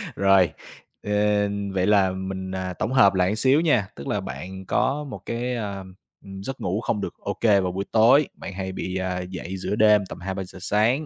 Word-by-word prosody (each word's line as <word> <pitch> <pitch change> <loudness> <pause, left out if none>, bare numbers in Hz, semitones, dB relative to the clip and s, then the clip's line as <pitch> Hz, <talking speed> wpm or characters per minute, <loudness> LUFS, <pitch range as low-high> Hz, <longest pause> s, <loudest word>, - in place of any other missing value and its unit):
Rồi, 95 -4 +4 0.5
ờ, 105 - -4 0.6
vậy 95 0 +1
là 100 -3 +4
mình, 95 0 -5
à, 95 -1 -3
tổng 110 +7 -3
hợp 100 -7 +6
lại 95 +2 +1
xíu 135 +7 +3
nha, 125 -12 +2
tức 70 - -8
là - - 0
bạn 95 +9 -7
có 135 +8 0
một 140 - -8
cái, 120 +2 -2
a, 105 -4 -4 0.5
ừm, 95 0 -8
giấc 135 +6 -6
ngủ 95 +4 -1
không 110 -3 -1
được - - -4
ô 100 - -4
kê 105 -4 +5
vào 90 -1 -1
buổi 95 +2 -3
tối, 120 +6 +5
bạn 95 - -8
hay 95 0 -4
bị, 95 0 -4
à, 95 -1 -2
dậy 95 +1 -6
giữa 95 - -2
đêm 105 -2 +5
tầm - - -8
2:00-3:00 95 0 -6
sáng. 110 +10 +1
100 Hz, 205 wpm, -24 LUFS, 95-110 Hz, 0.6 s, hợp